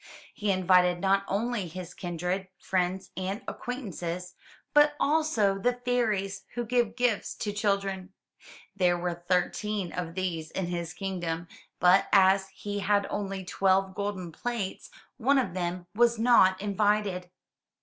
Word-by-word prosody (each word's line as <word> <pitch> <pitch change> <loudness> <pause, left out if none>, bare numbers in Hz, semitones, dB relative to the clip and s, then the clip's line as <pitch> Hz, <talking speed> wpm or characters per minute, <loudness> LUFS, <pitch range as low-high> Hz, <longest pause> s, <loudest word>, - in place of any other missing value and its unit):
He 210 -1 -2
invited 180 -1 +4
not 195 +1 +2
only 210 -1 -1
his 175 +1 -8
kindred, 180 +2 -3
friends 185 0 -1
and 190 +3 -3
acquaintances, 180 -8 -5 0.4
but 295 0 +5
also 280 -10 +2
the 245 +5 +2
fairies 210 -6 0
who 240 0 -2
give 235 -1 +1
gifts 245 -4 0
to 205 - -3
children. 195 -2 -1 0.6
There 180 -3 +3
were 175 0 -2
thirteen 190 +1 0
of 175 -2 -5
these 170 -4 -2
in 190 - -3
his 170 -1 -4
kingdom, 175 -3 -3 0.3
but 180 +2 +5
as 195 0 +5
he 205 +1 -5
had 200 0 +2
only 195 -2 -3
twelve 190 0 +2
golden 195 -3 -4
plates, 225 0 -4 0.3
one 275 +3 +3
of 235 -10 0
them 175 0 -3
was 235 +1 +3
not 220 -5 +5
invited. 205 -2 0
195 Hz, 135 wpm, -28 LUFS, 180-210 Hz, 0.6 s, but